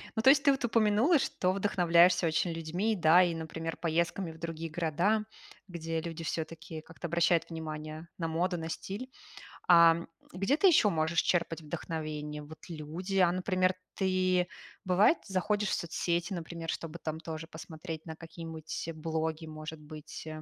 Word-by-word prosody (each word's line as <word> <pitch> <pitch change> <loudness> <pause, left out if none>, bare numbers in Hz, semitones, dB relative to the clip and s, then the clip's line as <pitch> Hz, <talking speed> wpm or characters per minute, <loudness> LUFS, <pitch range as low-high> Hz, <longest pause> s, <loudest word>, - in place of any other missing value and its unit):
Ну, 220 - +1
то 265 - +7
есть 275 0 +6
ты 280 - +6
вот 270 - -1
упомянула, 230 +7 +4
что 185 -7 0
вдохновляешься 180 -3 +4
очень 160 +2 +1
людьми, 175 +7 -1
да? 175 +1 +6
И, 175 -1 +1
например, 165 0 -4
поездками 170 +1 -1
в 160 - -13
другие 165 0 -5
города, 175 +7 +1 0.4
где 165 -2 -3
люди 165 0 -6
всё-таки 160 0 -5
как-то 165 +2 -8
обращают 170 +1 +2
внимание 155 0 -6
на 165 -2 -2
моду, 175 +2 0
на 160 0 -5
стиль. 205 +10 -5 0.6
А, 170 -1 +8
м, 170 - -6 0.2
где 195 - +1
ты 390 - +5
еще 295 - +6
можешь 160 0 +1
черпать 170 -2 0
вдохновение? 150 -1 -5
Вот 155 +2 -12
люди, 170 +5 -4
а, 175 -2 +5
например, 185 0 +1 0.2
ты, 185 -2 +2 0.4
бывает, 190 - +5
заходишь 205 +2 0
в - - 0
соцсети, 170 +1 -1
например, 165 -1 -5
чтобы 165 +1 -4
там 160 -1 -4
тоже 160 -1 -6
посмотреть 160 0 -8
на 160 -1 -6
какие-нибудь 165 -1 -7
блоги, 160 0 -3
может 155 0 -8
быть, 155 +1 -9
165 Hz, 160 wpm, -31 LUFS, 160-185 Hz, 0.6 s, А